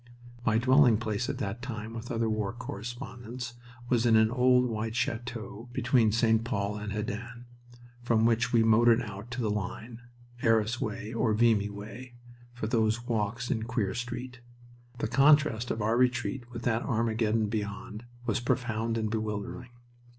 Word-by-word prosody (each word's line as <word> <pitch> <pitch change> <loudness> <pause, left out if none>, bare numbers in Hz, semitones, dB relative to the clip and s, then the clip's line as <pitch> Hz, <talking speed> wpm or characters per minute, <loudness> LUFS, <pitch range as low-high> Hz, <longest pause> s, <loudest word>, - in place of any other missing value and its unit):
My 110 -2 +3
dwelling 130 -1 +5
place 110 +2 -2
at - - -2
that 100 +4 -4
time, 115 -3 -6
with 115 +1 -7
other 115 -1 0
war 110 0 -1
correspondents, 120 +1 -7 0.3
was 120 -2 +2
in 115 -2 +4
an 110 0 +5
old 125 0 +4
white 110 -1 -3
chateau 120 -1 -4
between 120 -3 +3
St. 115 0 +3
Pol 105 -4 -2
and 105 0 -5
Hesdin, 115 +3 -5 0.6
from 115 -2 +2
which 115 +1 +2
we 115 -2 +4
motored 115 +2 +5
out 105 +2 -8
to 125 +1 -4
the 110 -3 0
line, 110 +3 -5 0.4
Arras 115 -1 +2
way 110 +1 -4
or 115 -2 +1
Vimy 110 -3 +3
way, 110 +5 -9 0.4
for 120 -2 -5
those 115 +1 +1
walks 115 0 -1
in 110 - 0
Queer 110 -4 -1
Street. 125 +1 -5 0.6
The 115 - -1
contrast 135 -3 +4
of 110 - -2
our 110 +2 +2
retreat 125 0 0
with 120 -1 -7
that 115 -1 +1
Armageddon 110 -1 +1
beyond 105 +1 -5 0.2
was 110 -2 0
profound 115 -2 -1
and 110 -1 0
bewildering. 110 +2 -4
115 Hz, 160 wpm, -29 LUFS, 110-120 Hz, 0.6 s, dwelling